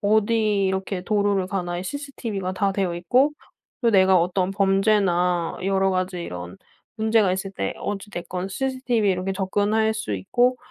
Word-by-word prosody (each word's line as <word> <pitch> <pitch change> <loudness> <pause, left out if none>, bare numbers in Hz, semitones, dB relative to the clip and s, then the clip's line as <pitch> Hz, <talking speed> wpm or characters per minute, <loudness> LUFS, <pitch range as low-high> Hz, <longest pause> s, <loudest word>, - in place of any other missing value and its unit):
어디 215 -1 +2
이렇게 190 0 -2
도로를 200 -2 +1
가나 175 -2 -3
이 180 - -5
CCTV가 225 -7 -4
다 195 +1 0
되어 190 -3 -1
있고 250 +11 +3 0.5
또 235 - +3
내가 190 -2 +5
어떤 180 +2 0
범죄나 195 -3 +2
여러 195 0 +2
가지 185 -1 -2
이런 90 - -7 0.4
문제가 220 -3 +3
있을 190 +1 -3
때 95 - -3
어찌 205 +1 -5
됐건 180 0 -5
CCTV에 245 -1 0
이렇게 185 +1 -2
접근할 205 +3 +1
수 220 - -3
있고 245 - +1
195 Hz, 330 characters per minute, -23 LUFS, 185-215 Hz, 0.5 s, 내가